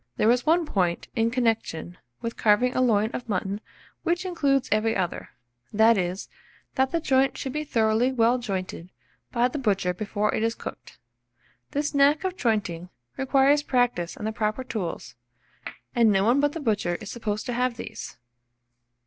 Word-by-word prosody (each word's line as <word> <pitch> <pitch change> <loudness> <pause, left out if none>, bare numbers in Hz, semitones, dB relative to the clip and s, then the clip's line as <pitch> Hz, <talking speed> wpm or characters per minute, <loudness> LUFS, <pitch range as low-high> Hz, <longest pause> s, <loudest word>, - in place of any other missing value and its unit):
There 220 - +4
is 250 +4 0
one 335 +1 +4
point 180 - -1
in 225 -1 +2
connection 225 -8 -1 0.3
with 230 0 -4
carving 225 +4 +3
a - - +2
loin 220 -3 +2
of 245 - -6
mutton 200 +1 -2 0.4
which 350 +2 -1
includes 285 -7 +1
every 215 +2 +2
other; 180 -3 -2 0.4
that 220 +2 +5
is, 185 0 -2 0.5
that 265 0 +2
the 335 - 0
joint 270 -3 +2
should 265 -2 -4
be 300 0 -2
thoroughly 230 -2 +2
well 240 0 +3
jointed 185 -6 -4 0.4
by 240 0 +2
the 295 - -4
butcher 195 -7 +1
before 210 +2 -1
it - - 0
is 230 +1 0
cooked. - - -9 0.7
This 295 +1 -2
knack 285 +3 +4
of 375 -1 -2
jointing 190 - -1 0.3
requires 275 +2 +3
practice 245 -11 0
and 210 - -5
the 220 - -1
proper 215 +3 -2
tools; 210 -9 -5 0.8
and 230 -2 +4
no 195 -1 +3
one 245 +5 +4
but 290 0 +2
the 330 - -4
butcher 205 - 0
is 205 +2 -7
supposed 215 -2 -3
to 245 - -3
have 250 -1 0
these. - - -8
230 Hz, 170 wpm, -26 LUFS, 210-265 Hz, 0.8 s, that